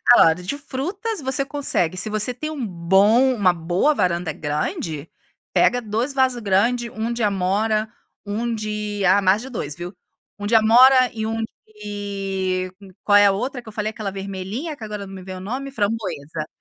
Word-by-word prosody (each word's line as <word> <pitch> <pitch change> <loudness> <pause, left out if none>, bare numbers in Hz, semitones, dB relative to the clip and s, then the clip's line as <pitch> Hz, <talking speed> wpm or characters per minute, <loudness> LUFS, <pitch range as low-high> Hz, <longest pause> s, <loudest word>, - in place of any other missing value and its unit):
Salada 165 -2 +5
de 200 +11 -4
frutas 345 - -4
você 265 +1 +2
consegue, 270 - 0
se 205 +4 +2
você 215 +3 0
tem 305 +5 -5
um 285 -6 -4
bom 200 +9 +3
uma 185 -5 +3
boa 175 - +1
varanda 175 - 0
grande, 150 +1 -3 0.5
pega 245 - +3
2 230 +4 -2
vaso 260 -3 +1
grande, 235 +5 +1
1 225 +2 -3
de 235 - -4
amora, 210 +2 +1 0.4
1 230 +3 -2
de 210 -2 -3
ah 190 +3 +5
mais 195 +4 +3
de 265 - -8
2 150 - -5
viu, 175 +3 -7 0.5
1 205 - -3
de 225 - +2
amora 250 +4 +6
e 220 -1 -3
1 225 0 -2 0.2
de 195 -3 -3 0.3
qual 205 - +3
é 205 0 +7
a - - +5
outra 250 +6 -3
que 235 - -24
eu 215 - -12
falei, 215 0 -2
aquela 215 -2 -5
vermelhinha 195 - -5
que 240 - -12
agora 210 -2 -5
não 195 - -10
me 190 - -8
vem 185 0 -8
o - - -7
nome? 255 +9 -4
Framboesa, 200 - -3
210 Hz, 185 wpm, -22 LUFS, 190-240 Hz, 0.5 s, é